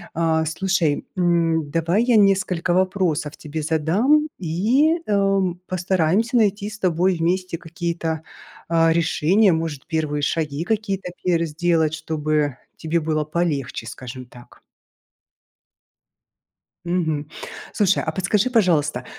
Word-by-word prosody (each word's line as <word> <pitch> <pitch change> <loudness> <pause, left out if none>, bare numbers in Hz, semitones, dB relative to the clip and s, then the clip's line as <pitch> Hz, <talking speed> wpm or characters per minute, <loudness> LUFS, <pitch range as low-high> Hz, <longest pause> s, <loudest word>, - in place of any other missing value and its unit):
Э, 160 -1 +1
слушай, 165 -2 0
м, 165 -3 +1
давай 170 +7 +1
я 245 -3 +3
несколько 185 -4 +2
вопросов 180 -5 0
тебе 155 0 -5
задам 200 - +2
и, 240 - +2
эм, 195 -3 +1
постараемся 185 +6 +1
найти 205 -1 +1
с 215 0 -10
тобой 180 +1 +2
вместе 180 +1 -1
какие-то, 165 -1 -4 0.5
э, 165 -1 +3
решения. 170 +4 +3
Может, 160 -4 -3
первые 155 -2 -1
шаги 150 0 -1
какие-то 195 -3 -2
пер 170 -2 +2
сделать, 160 0 +1
чтобы 155 -3 -1 0.2
тебе 165 +1 -1
было 155 -1 -1
полегче, 150 -8 -2
скажем 125 +1 -8
так. 120 0 -17 2.2
Мгм. 160 -4 -1 0.4
Слушай, 200 -3 +2
а 160 - -3
подскажи, 200 +6 +1
пожалуйста, 155 - +2
170 Hz, 115 wpm, -22 LUFS, 155-190 Hz, 2.2 s, я